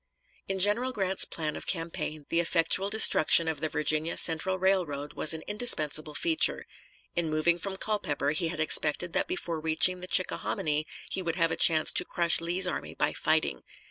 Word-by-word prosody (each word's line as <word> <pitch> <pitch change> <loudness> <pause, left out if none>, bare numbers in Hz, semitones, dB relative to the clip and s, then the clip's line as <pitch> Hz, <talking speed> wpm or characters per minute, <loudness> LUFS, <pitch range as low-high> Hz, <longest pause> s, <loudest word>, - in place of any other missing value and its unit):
In 195 - -4
General 210 +7 +2
Grant's 190 -4 +2
plan 155 -2 -4
of - - -10
campaign 165 -3 -5
the 165 - 0
effectual 170 +3 +1
destruction 170 -6 +4
of 160 -3 -3
the 155 +1 -3
Virginia 155 +2 -1
Central 175 +3 +3
Railroad 175 -7 -2
was 160 - 0
an 160 - -10
indispensable 155 -9 0
feature. 330 -1 0 0.5
In 170 -2 -1
moving 155 +3 0
from 195 +2 -6
Culpeper 205 -8 -3
he 155 +2 -2
had 165 -1 -5
expected 155 +2 +2
that - - -1
before 175 - -4
reaching 160 +3 +4
the 180 - -9
Chickahominy 155 -4 0 0.2
he 190 - -3
would 170 -2 -4
have 165 -2 0
a - - -1
chance 155 -2 +4
to - - +1
crush 170 -1 +1
Lee's 175 +3 +1
army 180 - -5
by - - -1
fighting. - - -1
170 Hz, 175 wpm, -27 LUFS, 155-190 Hz, 0.5 s, destruction